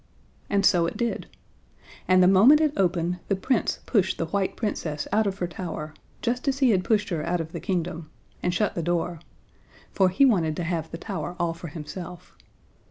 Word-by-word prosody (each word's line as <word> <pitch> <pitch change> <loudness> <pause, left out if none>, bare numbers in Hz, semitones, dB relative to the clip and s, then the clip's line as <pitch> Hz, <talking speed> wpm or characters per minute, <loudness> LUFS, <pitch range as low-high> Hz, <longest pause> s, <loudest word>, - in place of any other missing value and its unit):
And 200 -1 +2
so 170 -3 +4
it - - -5
did. 235 -1 -2 0.8
And 185 0 +5
the - - +6
moment 215 +11 +7
it 305 -2 +2
opened, 180 -1 0
the 195 - +1
Prince 230 +5 0
pushed 190 -6 +1
the 165 - -1
white 190 +3 -1
Princess 155 -9 -3
out 215 +1 +2
of 195 -1 -2
her 180 - -1
tower, 165 -3 -6 0.3
just 245 +3 -1
as 270 -1 +1
he 265 -4 +4
had 185 -3 +2
pushed 215 0 +1
her 165 -5 -2
out 175 +2 0
of 160 -1 -5
her 170 - -5
kingdom, 170 -2 -3 0.3
and 180 - 0
shut 205 +3 0
the 170 - -2
door. 170 0 -1 0.7
For 190 -2 +3
he 190 +10 +4
wanted 170 - +2
to 175 - -3
have 170 -1 -2
the 165 - -6
tower 175 -3 -5
all 170 -1 0
for 170 +1 -8
himself. 165 +3 -8
180 Hz, 200 wpm, -25 LUFS, 170-205 Hz, 0.8 s, moment